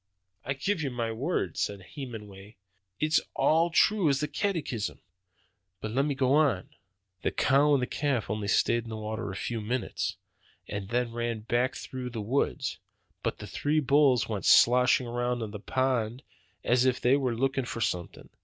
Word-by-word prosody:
"I 135 - -1
give 165 +7 -1
you 140 - -1
my 120 -2 -2
word," 115 - -2
said 100 -2 -2
Hemenway, 105 -6 -8 0.4
"it's 155 +1 +3
all 165 +2 +3
true 185 0 +3
as 140 -1 +2
the 150 - -1
catechism. 150 - -2 0.8
But 110 - -5
let 135 +4 +1
me 145 -2 -1
go 130 0 +2
on. 145 -11 +2 0.5
The - - +1
cow 140 +3 +3
and 130 - +1
the - - +2
calf 135 -5 -1
only 105 0 -3
stayed 115 +3 +2
in - - -8
the 110 - -5
water 110 0 -4
a 95 - -6
few 115 +3 -3
minutes, 120 +4 -2 0.5
and 100 -1 -5
then 120 0 0
ran 120 -1 -2
back 120 +4 0
through 130 -1 -6
the 115 -2 -6
woods. 125 +7 -1 0.4
But - - -2
the - - -8
three 150 +2 0
bulls 140 -3 +4
went 105 -3 -3
sloshing 125 +1 +5
around 120 0 -1
in 105 - -5
the 105 - -7
pond 125 0 -1 0.4
as 125 +1 +3
if 130 -1 +2
they 125 +2 +4
were 130 -4 0
looking 135 +1 0
for 115 - -5
something. 90 -6 -3
125 Hz, 180 wpm, -28 LUFS, 110-140 Hz, 0.8 s, sloshing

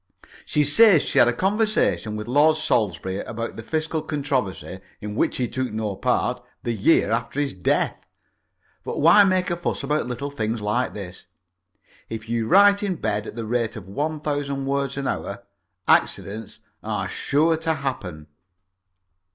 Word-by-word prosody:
She 150 - +2
says 175 +3 +6
that - - -6
she - - +2
had - - +7
a - - +4
conversation 195 - 0
with 105 +1 -5
Lord 145 +5 +4
Salisbury 95 - 0
about 115 +2 -5
the - - -7
fiscal 155 +5 -2
controversy, 135 - -3 0.2
in 105 0 -6
which - - 0
he 125 - 0
took 130 0 -3
no 105 -2 -3
part, 125 +2 0 0.2
the 120 - -1
year 110 +1 +3
after 115 +5 -2
his 145 -1 -1
death. 90 -1 0 0.9
But - - -5
why 170 +7 +7
make 185 -2 +1
a - - +1
fuss 175 -4 -3
about 150 -1 0
little 125 +3 -4
things 115 -4 -2
like 105 +5 -1
this? 90 -3 -9 0.8
If 110 0 -6
you 115 -1 -1
write 200 - +6
in 200 -3 -1
bed 105 -8 -2
at - - -8
the 115 -1 -4
rate 115 0 -1
of 100 -4 -9
one 150 +9 -3
thousand 145 -2 -2
words 140 0 -1
an 140 -1 -2
hour, - - -4 0.4
accidents 110 +3 0 0.2
are - - -3
sure 160 +3 +1
to 160 0 -1
happen. 95 - -5
130 Hz, 165 wpm, -23 LUFS, 110-155 Hz, 0.9 s, had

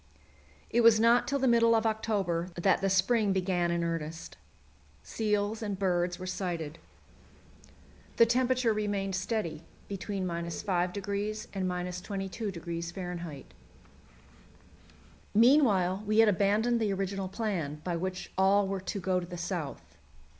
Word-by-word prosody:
It 240 - +3
was 230 -1 +6
not 235 +2 +4
till 280 - 0
the 265 -1 +1
middle 230 -1 +5
of 225 0 +1
October 200 -6 -1
that 185 +2 +2
the 195 - +1
spring 195 +2 +2
began 180 -2 0
in 170 0 0
earnest. 165 -1 -4 0.7
Seals 210 0 -1
and 205 -3 -3
birds 180 -2 0
were 185 - -7
sighted. 170 -4 -4 1.4
The 230 - +6
temperature 250 0 +2
remained 205 -2 -2
steady, 190 -5 -2 0.3
between 195 -1 -4
5° 190 +4 -2
and 190 -2 -1
22° 180 -2 -4
F. - - -23 1.9
Meanwhile 210 -6 +4
we 215 0 +1
had 225 0 +7
abandoned 210 +5 +2
the 210 -2 +1
original 195 0 -2
plan, 185 -8 -3
by 175 -2 -2
which 185 +2 -4
all 195 +1 +4
were 195 -1 -3
to 195 +2 -4
go 185 -1 0
to 175 - -7
the 175 0 -7
south. 175 -4 -5
195 Hz, 130 wpm, -30 LUFS, 180-215 Hz, 1.9 s, had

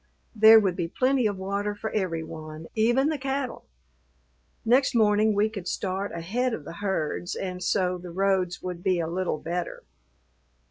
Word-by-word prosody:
There 220 +1 +9
would 190 -4 0
be 175 -2 -2
plenty 255 +5 +2
of 205 -2 -3
water 200 +2 -2
for 220 +1 -5
every 180 -6 -1
one, 155 -1 -8
even 240 +6 +3
the 310 -2 -2
cattle. 270 0 -3 1.0
Next 255 +3 +3
morning 215 -1 +4
we 205 +1 +3
could 200 -5 -7
start 195 0 -2
ahead 225 +9 -1
of 150 - -9
the - - -7
herds 180 -3 -2
and 180 -1 -4
so 180 -2 0
the 175 0 -9
roads 185 0 0
would 180 -1 -5
be 185 -1 +1
a 165 - 0
little 175 0 -2
better. 170 +3 -4
195 Hz, 170 wpm, -26 LUFS, 175-220 Hz, 1.0 s, There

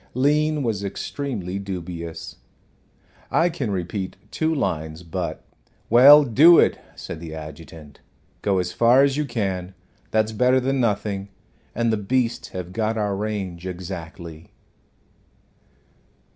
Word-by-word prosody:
Lean 150 +3 +2
was 110 -5 -2
extremely 100 -2 -4
dubious. 85 -4 -6 0.9
"I 170 +1 +3
can 145 -9 -3
repeat 95 0 -3 0.2
two 160 +7 0
lines, 80 - -2
but 80 - -4 0.2
" - - -38
"Well, 140 +5 +9
do 145 +7 +7
it," - - +3 0.2
said - - -7
the 80 -1 -8
adjutant. 80 -1 -11 0.4
"Go 100 -2 +1
as 90 -1 -1
far 120 +6 +5
as 140 -1 +2
you 150 0 -1
can. 95 -7 -3 0.3
That's 110 0 +1
better 125 +4 +3
than 135 +1 0
nothing. 100 -4 -1 0.5
And 115 -1 +1
the - - +1
beasts 120 +3 -1
have 90 -1 -7
got 110 +1 -1
our 105 -2 0
range 95 -4 -4
exactly." 85 -2 -8
100 Hz, 130 wpm, -23 LUFS, 90-125 Hz, 0.9 s, Well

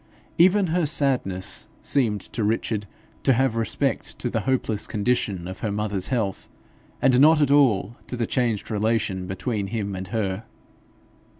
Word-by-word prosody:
Even 190 +3 +5
her 175 -3 +2
sadness 130 - +1
seemed 110 -8 +1
to 115 - -4
Richard 105 -1 -1 0.3
to 135 - +3
have 130 -1 +1
respect 115 -2 -1
to - - -3
the - - 0
hopeless 115 -5 -1
condition 105 -5 -1
of 95 - -7
her 105 - -2
mother's 100 -2 -2
health, 110 -7 -2 0.5
and 130 -1 +5
not 155 +3 +6
at 145 -2 +2
all 120 -7 +3
to 125 - -5
the 115 - 0
changed 115 -3 -1
relation 105 -3 0
between 100 +2 -3
him 100 -2 -3
and 95 0 -6
her. 105 0 -2
110 Hz, 155 wpm, -24 LUFS, 100-130 Hz, 0.5 s, not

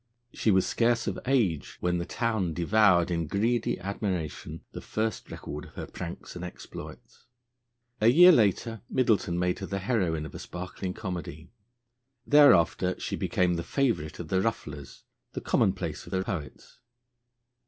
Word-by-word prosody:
She - - 0
was 95 -2 +4
scarce 115 -1 +1
of - - -2
age 105 - +1
when 90 0 0
the 85 - -4
town 110 -8 -1
devoured 90 -1 +4
in 85 -2 -1
greedy 115 +7 0
admiration 90 -5 -4
the - - -7
first 110 +1 -3
record 75 0 -7
of - - -16
her - - -5
pranks 85 -1 -8
and 90 - -6
exploits. 90 +5 -10 0.7
A 110 - +5
year 175 +9 +9
later 115 - +2
Middleton 110 -8 +1
made 90 0 0
her 95 - -5
the 100 - -3
heroine 95 -7 0
of - - -9
a - - -7
sparkling 90 +1 -6
comedy. 85 -5 -6 0.7
Thereafter 105 - +5
she - - -3
became 90 -1 +1
the 85 - -3
favourite 100 - -1
of 85 -3 -7
the 95 0 +2
rufflers, 75 -10 -4 0.3
the - - -4
commonplace - - 0
of - - -10
the 95 0 +1
poets. 85 +5 -7
95 Hz, 155 wpm, -28 LUFS, 85-115 Hz, 0.7 s, year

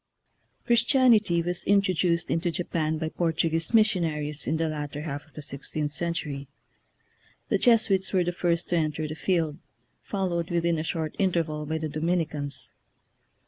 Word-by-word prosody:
Christianity 235 -7 +4
was 175 +1 -1
introduced 185 -4 +2
into 165 +1 +1
Japan 160 -2 -1
by 160 0 -2
Portuguese 165 -1 0
missionaries 165 -10 +1
in 160 - +1
the 165 0 0
latter 150 -1 -4
half 145 -1 -5
of 155 - -26
the 150 - -8
sixteenth 145 +2 -3
century. 150 -4 -2 1.0
The - - +2
Jesu 230 -4 +4
its 190 0 +1
were 185 -2 +3
the 175 - -1
first 175 -1 0
to 175 - +2
enter 155 -1 -1
the 155 - -5
field, 160 -3 0 0.4
fol 195 -2 -2
lowed 170 -1 -2
within 170 -2 +1
a - - -2
short 160 -1 -3
interval 165 -6 0
by 160 +1 -1
the 160 0 -3
Dominicans. 155 -2 -2
165 Hz, 155 wpm, -27 LUFS, 155-180 Hz, 1.0 s, Christianity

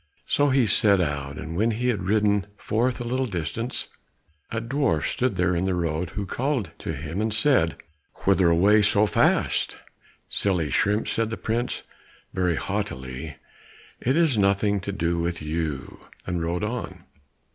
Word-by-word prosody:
So 145 0 +2
he 130 -2 +4
set 100 -2 +4
out, 70 -4 -2
and 80 +1 -6
when 110 +6 +2
he 120 +3 0
had 115 - 0
ridden 105 +1 +2
forth 120 +4 0
a - - -3
little 130 +2 -1
distance, 100 - -3 0.6
a 115 - -2
dwarf 115 - 0
stood 125 -4 0
there 90 0 +1
in 85 +2 0
the 95 -1 +1
road 85 0 -1
who 100 - -1
called 125 - -1
to - - -4
him 80 +7 -4
and 110 0 0
said, 110 - +3 0.5
"Whither 95 -3 +4
away 100 +6 +5
so 105 0 +4
fast?" 100 - +2 0.5
"Silly 90 -7 0
shrimp," 105 +8 +2
said 115 -1 0
the 110 - -4
prince, 120 +2 -2 0.5
very 90 -2 +1
haughtily, 75 -8 -4 0.6
"it 130 +5 +1
is 155 -10 +3
nothing 100 +1 +2
to 100 +1 -4
do 85 -3 -1
with 85 0 -1
you," 75 -3 -3 0.3
and 90 -2 -2
rode 85 +3 -1
on. 120 +3 -4
100 Hz, 160 wpm, -25 LUFS, 85-115 Hz, 0.6 s, away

